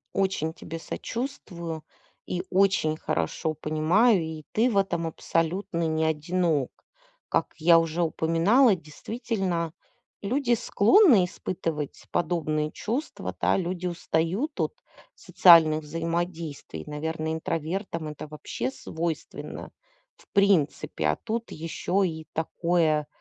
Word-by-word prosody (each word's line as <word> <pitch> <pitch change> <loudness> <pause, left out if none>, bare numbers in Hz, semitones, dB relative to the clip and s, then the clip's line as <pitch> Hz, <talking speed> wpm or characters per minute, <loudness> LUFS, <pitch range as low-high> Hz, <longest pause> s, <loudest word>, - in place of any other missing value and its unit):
Очень 190 -5 0
тебе 165 0 -7
сочувствую 170 - -5 0.4
и 180 0 -2
очень 190 -5 +3
хорошо 155 - -2
понимаю, 170 +8 +3
и 160 -1 -6
ты 230 +4 +3
в 215 - 0
этом 175 -4 +1
абсолютно 165 +1 -1
не 160 0 +1
одинок. 160 -2 0 0.6
Как - - 0
я 165 +1 +6
уже 165 +1 0
упоминала, 170 +9 +4
действительно, 180 - -3 0.5
люди 240 +4 +1
склонны 230 - +5
испытывать 165 -5 -4
подобные 155 -3 0
чувства, 245 +9 -4
да. - - +3
Люди 180 0 -2
устают 175 - -1
от - - -1 0.4
социальных 160 -3 +6
взаимодействий. 165 - -4
Наверное, 160 +1 -3
интровертам 165 +1 -3
это 150 0 -8
вообще 150 -4 -4
свойственно, 160 +3 -5 0.5
в - - -22
принципе. 180 - +2
А 75 - +2
тут 230 - -4
еще 175 +4 -1
и 160 -2 -7
такое, 160 -2 +1
165 Hz, 110 wpm, -26 LUFS, 155-190 Hz, 0.6 s, я